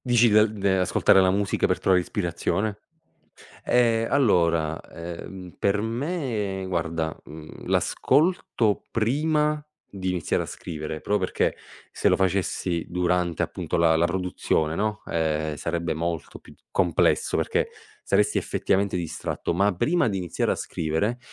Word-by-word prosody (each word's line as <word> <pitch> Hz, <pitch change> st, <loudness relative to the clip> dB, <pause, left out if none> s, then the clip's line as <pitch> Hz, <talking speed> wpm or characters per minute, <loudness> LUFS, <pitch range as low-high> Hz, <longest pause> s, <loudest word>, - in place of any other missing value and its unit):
Dici 120 Hz, -1 st, +5 dB
dal 105 Hz, 0 st, +5 dB
de 100 Hz, -3 st, +1 dB
ascoltare 95 Hz, +1 st, +4 dB
la 95 Hz, -, +4 dB
musica 100 Hz, +1 st, +1 dB
per -, -, 0 dB
trovare 95 Hz, -1 st, +3 dB
ispirazione? 100 Hz, +3 st, -2 dB, 0.8 s
Eh, 115 Hz, -2 st, +3 dB
allora, 85 Hz, -, +2 dB
ehm, 85 Hz, +2 st, -9 dB
per 100 Hz, +1 st, +2 dB
me 115 Hz, -, -2 dB
guarda, 85 Hz, -3 st, -2 dB
mhmm, 80 Hz, 0 st, -11 dB
l'ascolto 145 Hz, -, +1 dB
prima 150 Hz, +6 st, +1 dB, 0.2 s
di 95 Hz, -2 st, -4 dB
iniziare 90 Hz, -3 st, 0 dB
a -, -, -5 dB
scrivere, 80 Hz, -2 st, -6 dB
proprio 105 Hz, 0 st, 0 dB
perché -, -, 0 dB, 0.4 s
se -, -, +1 dB
lo -, -, +4 dB
facessi 95 Hz, -2 st, -1 dB
durante 90 Hz, -1 st, 0 dB
appunto -, -, -3 dB
la 85 Hz, -1 st, +4 dB
la 80 Hz, +1 st, +3 dB
produzione, 90 Hz, -3 st, -1 dB
no, 105 Hz, +4 st, -2 dB
ehm, 80 Hz, -2 st, -1 dB
sarebbe 85 Hz, +3 st, -2 dB
molto 80 Hz, -1 st, -4 dB
più -, -, -16 dB
di -, -, -32 dB
complesso, -, -, +2 dB
perché -, -, 0 dB, 0.3 s
saresti -, -, +2 dB
effettivamente 100 Hz, -1 st, 0 dB
distratto, 85 Hz, 0 st, -3 dB
ma 100 Hz, +4 st, +3 dB
prima 165 Hz, -, +2 dB
di 100 Hz, -, -2 dB
iniziare 90 Hz, -2 st, -2 dB
a -, -, +1 dB
scrivere, 85 Hz, +10 st, -2 dB
95 Hz, 140 wpm, -25 LUFS, 85-110 Hz, 0.8 s, Dici